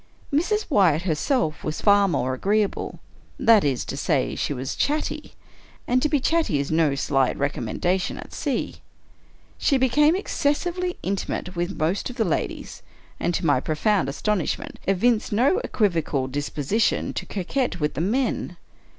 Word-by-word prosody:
Mrs. 420 +9 +1
Wyatt 180 - +3
herself 160 - 0
was 155 0 -3
far 205 -1 +5
more 130 -7 0
agreeable. 205 +9 -1 0.4
That 225 -3 +5
is 135 -4 0
to - - -5
say, 140 -1 0
she - - -2
was 130 -1 -3
chatty; 300 +2 -2 0.5
and 250 +1 +2
to 300 - +1
be 290 - +2
chatty 320 - +1
is 140 +1 -2
no 155 -3 +2
slight 135 -1 +1
recom 140 -5 -2
mendation 180 - -1
at - - -10
sea. - - -2 0.8
She 275 - +3
became 295 +5 +4
excessively 355 0 -1
intimate 190 -1 -3
with 175 +3 -2
most 170 +9 0
of 250 - -8
the 225 -3 +1
ladies; 170 - -3 0.4
and, 175 - 0
to - - -2
my 145 -4 +4
profound 160 - +1
astonishment, 190 +5 -2
evinced 215 +4 +2
no 255 - +3
equivocal 165 - 0
disposition 145 - -1
to - - -5
coquet 225 +7 -1
with 150 -1 0
the 145 - -2
men. 245 +9 -1
195 Hz, 150 wpm, -24 LUFS, 150-255 Hz, 0.8 s, far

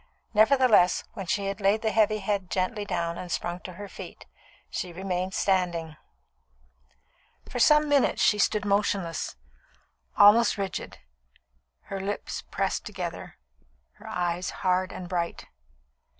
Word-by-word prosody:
Nevertheless, 220 -5 +5
when 195 -5 -7
she 200 +3 0
had 195 +1 -4
laid 200 +3 +2
the 220 - +1
heavy 215 0 +3
head 200 -2 -2
gently 200 +3 -1
down 170 -3 -2
and 180 - -7
sprung 175 +1 -2
to 185 - -9
her 205 +3 -8
feet, - - -10 0.4
she 180 - -4
remained 185 +1 -3
standing. 175 -5 0 1.5
For 245 - -5
some 300 +4 +5
minutes 285 -2 +2
she 210 - +3
stood 210 0 +1
motionless, 200 -4 0 0.8
almost 210 +3 +6
rigid, 195 -2 -4 0.8
her 195 - -6
lips 200 +1 -4
pressed 195 -1 -1
together, 185 -5 -6 0.6
her - - -12
eyes 175 0 -2 0.2
hard 185 0 +2
and 180 - -7
bright. 175 -1 -3
195 Hz, 130 wpm, -27 LUFS, 180-210 Hz, 1.5 s, almost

